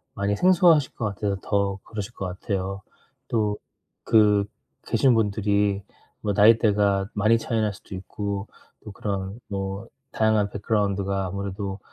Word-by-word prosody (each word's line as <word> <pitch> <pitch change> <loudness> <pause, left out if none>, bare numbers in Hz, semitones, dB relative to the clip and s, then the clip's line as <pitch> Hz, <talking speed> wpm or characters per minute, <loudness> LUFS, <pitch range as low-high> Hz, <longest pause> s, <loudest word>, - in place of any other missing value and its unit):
많이 100 +1 0
생소하실 175 -6 +4
것 115 - -4
같아서 100 0 -2
더 100 -1 0
그러실 105 -3 -6
것 95 - -5
같아요. 95 +1 -3 0.5
또 105 -3 0 0.5
그 105 -3 +4 0.4
계신 130 -2 +3
분들이 100 -1 +1 0.4
뭐 105 - -1
나이대가 105 -2 +4
많이 110 +2 +3
차이 115 0 -2
날 105 -1 0
수도 95 - -13
있고 100 +2 -4 0.4
또 105 - -8
그런 100 +1 -4
뭐 100 +2 -4 0.2
다양한 110 -2 +2
백그라운드가 100 -2 -1
아무래도 100 +1 -4
100 Hz, 280 characters per minute, -25 LUFS, 100-110 Hz, 0.5 s, 생소하실